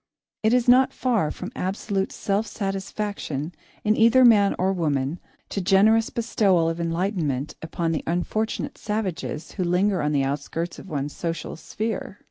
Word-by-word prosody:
It 220 - +3
is 245 0 +2
not 255 +2 +6
far 225 -11 +1
from 185 +7 -6
absolute 195 +1 -2
self 205 +2 -1
satisfaction, 195 -6 -4 0.3
in 215 0 +3
either 235 +3 +6
man 205 -4 +5
or 190 +1 +1
woman, 150 -2 -1 0.3
to 200 - -2
generous 215 +5 +4
bestowal 200 -7 +2
of 165 +1 -2
enlightenment 165 -5 -1
upon 165 +1 -2
the 160 - -2
unfortunate 180 +6 -2
savages 190 -7 -3
who 185 - -2
linger 180 +3 +2
on 150 0 0
the 140 -2 +2
outskirts 150 +5 -3
of - - -11
one's 145 -2 -3
social 170 -1 -4
sphere. 210 +4 -4
190 Hz, 150 wpm, -24 LUFS, 165-215 Hz, 0.3 s, not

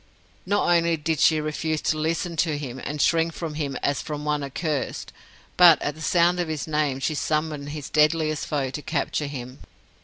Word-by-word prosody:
Not 205 +2 +1
only 170 -1 +3
did 155 0 -1
she 160 -1 +4
refuse 155 +1 -2
to 155 - +1
listen 165 +2 -1
to 155 -1 +1
him, 130 -3 -6
and 150 +1 -4
shrink 165 +2 +2
from 165 -2 -5
him 145 -3 -3
as 140 - 0
from 150 -1 -5
one 150 -1 0
accursed, 145 +1 -3 0.4
but, 175 -4 +8
at 145 - -2
the 155 - -13
sound 175 +2 +3
of 175 - -1
his 155 -3 -3
name, 150 -4 0
she 155 - -1
summoned 150 +1 -2
his 150 -1 -6
deadliest 155 0 +2
foe 135 -3 -1
to 150 - -5
capture 150 -1 -2
him. 130 -2 -7
155 Hz, 190 wpm, -24 LUFS, 145-160 Hz, 0.4 s, but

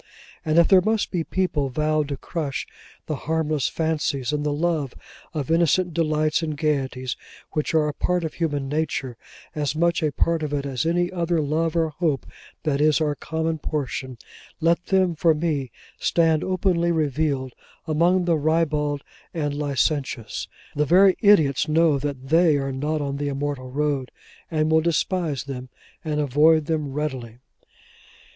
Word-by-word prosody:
And 155 +1 +1
if 170 - +6
there 190 -2 +6
must 220 +2 0
be 175 -3 -1
people 160 -7 -1
vowed 155 +2 0
to 140 -1 -4
crush 145 -3 -4 0.4
the 155 - -2
harmless 155 -3 +1
fancies 150 -4 -1
and 150 0 -1
the 150 - 0
love 150 -3 -1 0.4
of 150 -2 -3
innocent 170 +1 +2
delights 155 -1 +1
and 155 -2 -3
gaieties, 135 -4 -1 0.4
which 155 +1 -1
are 155 -1 +3
a 150 - -2
part 180 +4 0
of 160 - -3
human 145 -5 -2
nature: 145 -4 -2 0.4
as 150 -1 -2
much 170 +2 +2
a 155 -2 +1
part 165 +2 +1
of 150 -1 -3
it 140 -1 -1
as 135 +2 -2
any 175 +1 +1
other 170 -2 0
love 155 +3 0
or 165 -1 +2
hope 155 -3 -1 0.4
that 145 -2 0
is 155 0 +4
our 150 -2 +1
common 160 +2 -3
portion: 130 -5 -4 0.4
let 170 +2 +1
them, 190 -2 +3
for 160 0 +3
me, 150 -5 -1 0.3
stand 165 -2 +2
openly 180 -2 +1
revealed 145 -4 0 0.3
among 175 +3 +2
the 170 -2 +2
ribald 150 -2 0 0.3
and 145 -3 -1
licentious; 140 -4 -1 0.3
the 150 - +2
very 185 +5 +5
idiots 160 - +4
know 155 -2 +3
that 135 -2 -5
they 165 -1 +5
are 135 -1 -2
not 150 +3 -2
on 140 -1 -3
the 145 0 -2
Immortal 140 -2 -3
road, 140 -1 -1 0.4
and 155 -1 0
will 160 0 +5
despise 170 -2 0
them, 130 -2 -7 0.3
and 150 -1 -1
avoid 150 +2 +4
them 150 -3 -2
readily. 130 -6 -4
155 Hz, 160 wpm, -24 LUFS, 140-165 Hz, 0.4 s, if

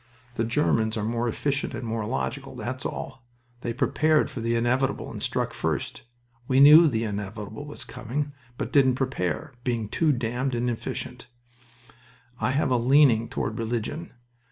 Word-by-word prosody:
The 115 - -1
Germans 115 -3 +1
are 105 - -2
more 115 +2 -1
efficient 140 +4 -1
and 125 - -5
more 110 -1 -2
logical 135 +2 -3
that's 130 +2 -4
all. 130 -1 -7 0.4
They 120 - -3
prepared 155 +5 +2
for 120 - -5
the 115 +1 0
inevitable 130 +3 0
and - - -7
struck - - -1
first. - - -2 0.5
We 130 0 +3
knew 150 +4 +9
the 115 -5 0
inevitable 105 +4 -5
was 145 - -8
coming, 145 +5 -4 0.2
but - - -4
didn't 130 -3 +5
prepare, 125 - -2
being 120 -4 -1
too 160 +6 +2
damned 125 +1 -1
inefficient... 120 0 -3 1.1
I - - +1
have 135 0 +1
a 125 - +4
leaning 125 -2 +4
toward 110 +2 -3
religion. 120 +9 -3
125 Hz, 155 wpm, -26 LUFS, 115-140 Hz, 1.1 s, knew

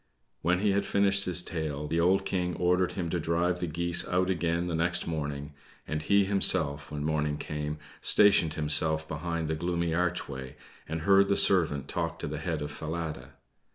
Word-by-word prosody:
When 90 +2 +1
he 105 -1 +2
had 100 +1 +1
finished 100 -1 +1
his 90 -1 0
tale, 75 -4 -4
the 80 +3 -1
old 95 +3 +2
King 90 -3 -2
ordered 90 +1 +1
him 85 -4 -4
to 90 - -1
drive 85 +2 0
the 90 - -2
geese 85 +2 +1
out 90 +1 +1
again 85 -1 -1
the 90 - -3
next 90 +2 0
morning; 75 -2 -4 0.3
and 75 0 -3
he 100 +5 +3
himself, 80 -7 +2
when 75 -1 -5
morning 75 -1 -1
came, 75 0 -4 0.2
stationed 90 -7 +4
himself 80 +1 +1
behind 80 +1 -3
the 80 - -1
gloomy 85 +1 -2
archway, 80 -7 -3 0.3
and 80 +1 -3
heard 100 +2 +4
the 100 - +1
servant 75 -7 +4
talk - - -3
to - - -5
the 75 0 -5
head 80 -2 -3
of 75 - -5
Falada. 75 -4 -6
85 Hz, 185 wpm, -28 LUFS, 75-90 Hz, 0.3 s, stationed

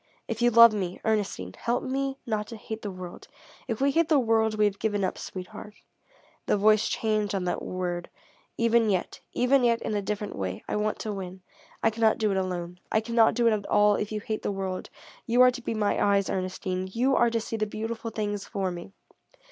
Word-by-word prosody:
If 225 0 -4
you 240 - +5
love 230 -1 +8
me, 185 -4 -3
Ernestine, 200 - -1
help 240 +1 -1
me 270 +1 -2
not 215 -2 -2
to 230 - -8
hate 220 0 -7
the 205 - -4
world. 185 -2 -9 0.4
If 230 -3 -2
we 275 +1 +3
hate 330 +2 +2
the 310 - +5
world, 225 -3 +2
we 210 - +4
have 200 -1 -1
given 205 -2 0
up. 185 - -1
Sweetheart," 190 +3 -8 0.7
the - - +3
voice 215 +1 +4
changed 215 -2 0
on 190 - -1
that 180 - -2
word 175 -1 -3 0.5
"even 230 -1 +3
yet 185 -3 -1
even 255 +1 +3
yet 235 -1 +3
in - - -2
a 205 - 0
different 210 +1 -4
way, 95 -1 -4
I - - -2
want 210 0 0
to 215 - -3
win. 185 -1 -7 0.4
I 225 - +4
cannot 220 0 +2
do 215 -2 +1
it 195 - 0
alone. 180 -2 -3
I 220 - +3
cannot 230 0 +3
do 240 - +2
it 230 - +5
at 205 -2 -3
all, 210 0 +4
if 205 +1 -2
you 210 -1 -3
hate 215 0 -3
the - - -2
world. 190 -1 -4 0.4
You 245 +1 +4
are 250 - +7
to 245 0 -7
be 230 - -3
my 210 -1 +1
eyes, 200 -1 +2
Ernestine. 185 0 -3
You 255 +5 +2
are 240 - +4
to 230 0 0
see 225 0 -5
the 215 -1 -1
beautiful 225 +2 -4
things 205 -2 -3
for 195 -4 -2
me. 175 +2 -8
215 Hz, 220 wpm, -27 LUFS, 195-230 Hz, 0.7 s, love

